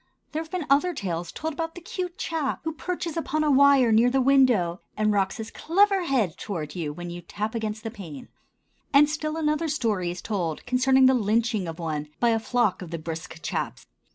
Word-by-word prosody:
There 310 - -2
have 320 - -9
been 360 -3 -3
other 305 +6 +3
tales 175 -6 -3
told 320 +1 -4
about 325 +2 -4
the - - -7
cute 360 0 -5
chap 315 -5 -2
who 320 - -2
perches 345 0 -4
upon 310 -2 -1
a 300 - +3
wire 275 -3 +6
near 225 +3 +5
the 265 +2 +2
window 250 -10 +3 0.2
and 215 0 +2
rocks 195 0 0
his 220 0 -6
clever 390 +2 +2
head 235 - 0
toward 155 -7 -4
you 160 -4 -3
when 175 +3 -7
you 175 0 -7
tap 210 +5 -4
against 220 -1 -3
the 225 - -4
pane; 170 - -9 0.6
and 290 +1 +6
still 305 +1 -3
another 305 +1 0
story 215 - 0
is 175 +1 -5
told 175 -7 -2
concerning 260 +1 +4
the 260 - +6
lynching 220 -3 +1
of 165 -1 -6
one 155 -3 -3
by 240 - +3
a 225 -1 +2
flock 225 -4 +1
of 180 - -7
the 165 - -4
brisk 160 0 -7
chaps. - - -3
235 Hz, 210 wpm, -26 LUFS, 180-300 Hz, 0.6 s, wire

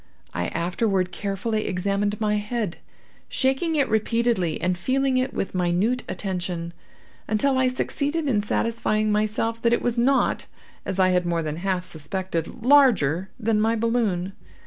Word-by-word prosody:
I 85 0 -1
afterward 185 +2 0
carefully 205 +3 -2
examined 200 +2 -1
my 210 -1 +1
head, 210 -3 -3 0.5
shaking 270 +5 +1
it 280 -3 +2
repeatedly, 220 -5 +1
and 180 0 0
feeling 260 +7 +1
it 255 +1 0
with - - -3
minute 185 +7 +1
attention, 180 -3 -3 0.5
until 240 +6 +2
I 260 - +3
succeeded 290 +4 -1
in 220 -6 +2
satisfying 215 0 0
myself 215 +2 0
that 235 0 +3
it - - +2
was 240 -1 0
not, 270 +3 +2 0.4
as 195 - -2
I 185 0 +5
had 180 -1 +1
more 170 -1 0
than 155 0 -3
half 185 0 -1
suspected, 170 +5 -4
larger 195 - +4
than 220 -1 +1
my 225 +1 +2
balloon. 215 -5 0
210 Hz, 145 wpm, -24 LUFS, 180-235 Hz, 0.5 s, I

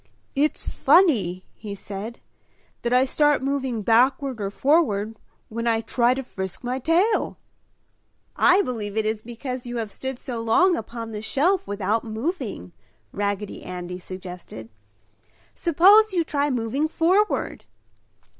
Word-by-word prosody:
"It's 295 +2 0
funny" 260 - +3
he 205 -2 -7
said, 205 +4 -7 0.6
"that 235 - -2
I 250 +1 +5
start 295 +1 +2
moving 265 -5 -1
backward 255 +2 +2
or 195 - -1
forward 225 -5 +1 0.3
when 230 +1 -4
I 225 -1 +2
try 240 +2 +2
to 270 - -4
frisk 190 -3 -6
my 250 +2 -2
tail!" 350 - +1 1.0
"I 370 +3 +5
believe 220 - -4
it 220 - +1
is 215 0 -1
because 245 +2 -6
you 240 0 -4
have 220 -3 -3
stood 265 +4 -5
so 245 -3 -5
long 345 +12 +4
upon 230 -1 -6
the 210 -1 -5
shelf 345 - +1
without 205 +2 -1
moving," 225 - -4 0.4
Raggedy 205 0 -3
Andy 180 0 -6
suggested. 180 - -9 0.8
"Suppose 390 +6 +5
you 345 -2 +2
try 290 -2 0
moving 255 +4 0
forward!" 365 +6 +1
240 Hz, 135 wpm, -24 LUFS, 210-290 Hz, 1.0 s, I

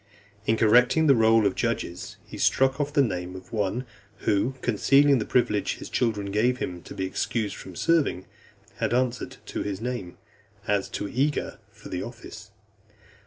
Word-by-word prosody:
In 110 - +3
correcting 125 +8 +5
the 140 - +7
roll 115 -2 +4
of 100 - +2
judges, 85 -1 -3
he - - -10
struck 135 +2 +2
off 145 0 -2
the 145 -1 +4
name 90 -5 -3
of 95 +3 -11
one 110 +4 -1 0.4
who, 110 +6 +1
concealing 135 +5 +4
the 110 - -2
privilege 105 -5 +1
his - - -10
children 105 -5 0
gave 120 +5 +2
him 90 -7 -4
to - - -11
be 95 - -2
excused 105 +2 -2
from 95 - -10
serving, 145 - +1 0.5
had - - 0
answered 125 -1 -1
to - - -4
his 100 -2 -3
name, 115 -6 -5 0.5
as 100 -1 +1
too 105 - -4
eager 140 +7 -1
for - - -13
the 90 - -3
office. 115 -2 -9
115 Hz, 165 wpm, -26 LUFS, 100-125 Hz, 0.5 s, the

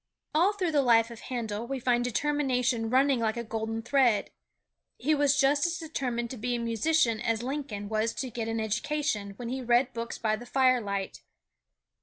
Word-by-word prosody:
All 345 +6 +4
through 370 -5 -1
the 295 -2 +3
life 230 -2 +4
of 230 - -9
Handel 230 -3 -4
we 270 0 -3
find 245 -1 +1
determination 250 -2 0
running 265 +1 +3
like 220 0 0
a 235 - -2
golden 225 0 -4
thread. 245 -4 +2 0.7
He 305 +5 +1
was 285 -1 +3
just 285 +4 +3
as 340 0 -2
determined 250 -7 -3
to 260 - -6
be 245 +2 -2
a - - -2
musician 230 +1 +1
as 230 -1 -1
Lincoln 255 -7 -4
was 220 +2 0
to 260 -2 -4
get 225 0 -4
an 225 0 -2
education 220 -1 -2
when 240 -1 -5
he 260 +1 -3
read 245 +1 +2
books 230 0 -5
by 215 -1 0
the 240 +2 -11
firelight. 240 -7 +1
240 Hz, 185 wpm, -28 LUFS, 225-275 Hz, 0.7 s, All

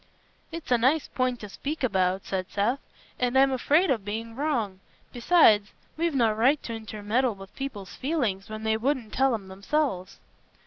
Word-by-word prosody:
"It's 330 -5 -7
a 245 - +4
nice 275 +6 +2
point 255 -1 -1
to 210 - -6
speak 290 +8 -5
about," 190 -4 +1
said 185 -1 -3
Seth, 225 +7 0 0.4
"and 250 +1 +1
I'm 270 0 +5
afraid 295 +6 +3
o' 245 - +2
being 220 +3 -5
wrong; 235 -10 -1 0.3
besides, 235 -6 +4 0.2
we've 330 -2 -1
no 230 -4 +3
right 250 +7 +3
t' 230 - -5
intermeddle 220 +2 -1
with 195 0 -13
people's 235 -9 -6
feelings 240 -9 -2
when 215 0 -6
they 220 0 +1
wouldn't 245 -2 -1
tell 265 -2 +3
'em 200 -3 -8
themselves." 195 0 -2
235 Hz, 170 wpm, -27 LUFS, 205-270 Hz, 0.4 s, I'm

